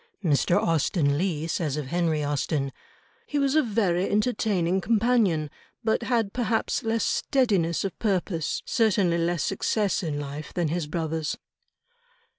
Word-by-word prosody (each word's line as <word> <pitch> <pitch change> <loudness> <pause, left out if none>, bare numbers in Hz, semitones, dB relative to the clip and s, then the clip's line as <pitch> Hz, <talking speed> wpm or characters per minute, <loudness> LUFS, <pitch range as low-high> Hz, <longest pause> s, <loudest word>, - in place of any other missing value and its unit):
Mr. 165 +1 +2
Austen 155 -2 +1
Leigh 160 -2 -1
says 160 -3 -1
of 150 - -3
Henry 165 -3 0
Austen, 145 -1 -1 0.6
"He 295 - -2
was 275 -1 +2
a 310 - +5
very 200 - +1
entertaining 200 -5 +1
companion, 205 - +2 0.3
but 220 +1 +1
had 230 -4 0
perhaps 230 -2 0
less 225 0 0
steadiness 200 - +1
of 195 - -5
purpose, 185 -6 -1
certainly 195 -7 +2
less 170 -1 0
success 200 0 0
in 155 -5 -3
life, 145 +1 -7
than 170 -3 0
his 165 -1 -2
brothers." 160 -1 -2
175 Hz, 135 wpm, -26 LUFS, 160-220 Hz, 0.6 s, a